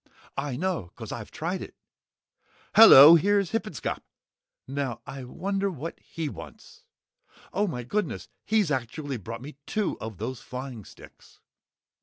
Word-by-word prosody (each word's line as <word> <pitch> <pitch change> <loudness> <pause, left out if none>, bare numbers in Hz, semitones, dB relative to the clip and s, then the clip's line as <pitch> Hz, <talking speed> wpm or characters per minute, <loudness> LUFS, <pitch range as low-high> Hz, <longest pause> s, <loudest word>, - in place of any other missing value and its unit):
I 140 -2 -3
know 170 - -2
'cause - - -8
I've - - -6
tried - - -4
it. - - -9 1.0
Hello 145 +5 +11
here's 200 +2 +3
Hippenscop! 215 - -3 0.7
Now 135 -3 -3
I 135 -1 -7
wonder 195 +8 -2
what 165 -1 -7
he 165 -2 -5
wants? - - -11 0.7
Oh! 205 +1 +1
My 125 -9 -4
goodness! 210 - -3 0.2
He's 210 -7 +1
actually 135 +2 -3
brought 115 +3 -8
me 145 0 -10
two 215 -2 -1
of 110 -4 -7
those 120 +4 -5
flying 125 -5 -7
sticks!" - - -17
145 Hz, 135 wpm, -27 LUFS, 125-190 Hz, 1.0 s, Hello